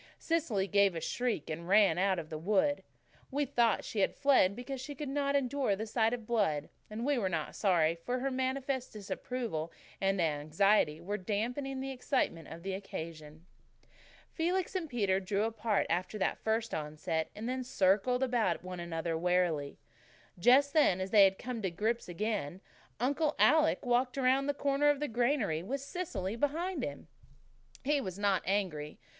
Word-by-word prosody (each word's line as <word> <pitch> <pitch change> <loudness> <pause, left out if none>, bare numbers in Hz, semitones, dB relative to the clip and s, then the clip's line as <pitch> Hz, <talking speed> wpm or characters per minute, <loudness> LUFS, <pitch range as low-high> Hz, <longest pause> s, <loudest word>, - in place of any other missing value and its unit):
Cecily 300 - 0
gave 200 -2 +3
a - - -2
shriek 235 - -2
and 165 +2 -5
ran 195 -3 +5
out 190 0 +2
of 160 -2 -6
the 155 - -3
wood. 280 - +1 0.5
We 285 +2 0
thought 240 -5 +2
she 215 - -4
had 195 - +2
fled 265 -9 +4
because 250 +2 -6
she 285 +2 -7
could 295 +2 -5
not 280 0 0
endure 270 -5 +1
the 215 +3 -4
sight 225 0 +1
of 235 -2 -4
blood, 195 -11 0 0.2
and 220 +3 -4
we 285 -2 +2
were 190 -4 0
not 160 -4 -3
sorry, 170 -5 +3
for 210 +10 -3
her 270 +2 -1
manifest 260 0 -2
disapproval 210 -5 -4 0.3
and 195 0 +1
anxiety 155 +2 +2
were 200 +5 -3
damping 245 +7 -2
the 270 0 -4
excitement 250 - -1
of 165 +1 -10
the 195 0 -3
occasion. 160 -4 -7 0.9
Felix 355 +3 0
and 355 -5 -3
Peter 200 -7 +1
drew 195 +2 -1
apart 225 -1 0
after 180 +5 -1
that 190 - -1
first 225 +1 -1
onset, 155 +1 -2
and 250 +5 -3
circled 215 +3 +2
about 235 -10 +1
one 180 -1 -6
another 165 -1 -3
warily. 170 -4 0 0.6
Then, 175 - -18
just 280 +5 +5
as 190 - +3
they 205 -3 +8
had 190 0 +2
come 245 -2 -5
to 190 - 0
grips 215 +5 -2
again, 190 -3 -2 0.4
Uncle 285 +5 +1
Alec 310 -2 +4
walked 250 +2 +1
around 270 +1 +2
the 285 - 0
corner 285 +1 +2
of 290 -1 +2
the 295 - -1
granary, 235 - +1
with 260 +10 -3
Cecily 275 - -4
behind 310 +5 -1
him. 145 +2 -6 0.8
He 290 +1 +2
was 185 -6 -5
not 200 -2 +2
angry. 175 -7 -1
215 Hz, 170 wpm, -32 LUFS, 180-265 Hz, 0.9 s, they